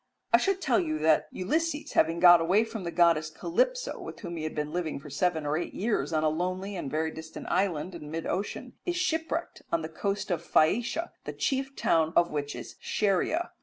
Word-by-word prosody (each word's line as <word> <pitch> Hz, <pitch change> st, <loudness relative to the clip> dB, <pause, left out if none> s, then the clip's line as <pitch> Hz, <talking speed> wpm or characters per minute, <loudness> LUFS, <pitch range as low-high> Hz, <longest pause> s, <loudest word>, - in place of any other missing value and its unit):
I -, -, +9 dB
should 390 Hz, -1 st, 0 dB
tell 250 Hz, -9 st, +3 dB
you 155 Hz, -3 st, -1 dB
that 155 Hz, 0 st, +3 dB
Ulysses, 305 Hz, -, -1 dB
having 165 Hz, +1 st, +2 dB
got 175 Hz, -1 st, +8 dB
away 185 Hz, +7 st, +3 dB
from 225 Hz, -4 st, -6 dB
the 170 Hz, -, -2 dB
goddess 165 Hz, -2 st, +3 dB
Calypso, -, -, -1 dB
with -, -, -8 dB
whom 175 Hz, -4 st, -5 dB
he 160 Hz, -1 st, -4 dB
had 155 Hz, -, -4 dB
been 150 Hz, 0 st, -3 dB
living 170 Hz, -5 st, -2 dB
for 145 Hz, +1 st, -11 dB
some 145 Hz, -, -6 dB
seven 170 Hz, -4 st, +1 dB
or 145 Hz, +1 st, +1 dB
eight 175 Hz, -, -5 dB
years 195 Hz, -9 st, 0 dB
on 155 Hz, -1 st, +1 dB
a -, -, +4 dB
lonely 185 Hz, +5 st, -2 dB
and 170 Hz, -6 st, -4 dB
very 160 Hz, +2 st, -1 dB
distant 160 Hz, 0 st, -9 dB
island 180 Hz, -2 st, 0 dB
in 150 Hz, -3 st, -8 dB
mid 165 Hz, +1 st, -4 dB
ocean, 195 Hz, +3 st, -3 dB
is 350 Hz, -, -1 dB
shipwrecked 325 Hz, -1 st, -1 dB
on 165 Hz, -1 st, +1 dB
the 155 Hz, -, -4 dB
coast 195 Hz, +4 st, -2 dB
of 170 Hz, -2 st, 0 dB
Phaeacia, 235 Hz, -, +2 dB
the -, -, -4 dB
chief 270 Hz, 0 st, -1 dB
town 160 Hz, 0 st, +2 dB
of 170 Hz, 0 st, +4 dB
which 145 Hz, -1 st, -3 dB
is -, -, -9 dB
Scheria. 215 Hz, -, 0 dB
175 Hz, 215 wpm, -28 LUFS, 160-225 Hz, -, I